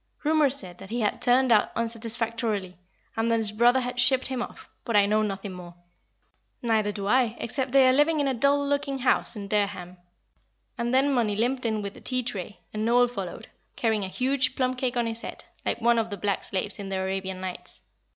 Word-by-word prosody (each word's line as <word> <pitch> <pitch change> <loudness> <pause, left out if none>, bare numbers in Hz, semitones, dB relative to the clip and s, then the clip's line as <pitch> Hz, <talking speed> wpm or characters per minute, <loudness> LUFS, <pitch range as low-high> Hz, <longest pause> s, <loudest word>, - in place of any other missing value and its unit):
Rumour 305 -1 +4
said 185 -10 -3
that 195 - -10
he 235 +2 -2
had 210 +3 -1
turned 250 0 +4
out 215 -2 +4
unsatisfactorily, 230 -4 -2 0.4
and 225 +1 0
that 230 - +3
his 220 -2 +3
brother 240 +4 +4
had 250 0 -4
shipped 260 +1 +3
him 260 -2 -2
off, - - -8 0.2
but 230 - -2
I 205 -1 +6
know 215 +1 +2
nothing 195 -1 -3
more." 175 -1 -10 0.9
"Neither 220 -3 +1
do 200 -1 -5
I, 240 +1 +2
except 260 +2 -2
they 270 -1 +6
are 255 - +5
living 295 +3 +3
in 285 - +1
a 270 - +1
dull 280 +4 +2
looking 280 -1 -1
house 250 -2 +1
in 200 -2 -6
Dereham." 200 -3 -2 0.8
And 235 0 -2
then 270 +2 +3
Mollie 225 -5 +1
limped 245 +3 0
in 215 -2 -1
with 200 0 -5
the - - -14
tea 255 -1 0
tray, 205 -4 -5
and 215 0 -2
Noel 245 +2 +4
followed, 210 -1 -6 0.3
carrying 220 -3 +1
a - - -2
huge 260 +5 0
plum 255 -1 +1
cake 250 -1 -2
on 240 - +1
his 230 0 -3
head, - - -8 0.2
like - - -1
one 235 0 +4
of 225 0 -1
the 200 - -5
black 200 -1 -1
slaves 200 +2 -2
in 200 -1 -5
the 195 - -2
"Arabian 190 0 -3
Nights." 185 -1 -7
230 Hz, 215 wpm, -26 LUFS, 205-255 Hz, 0.9 s, I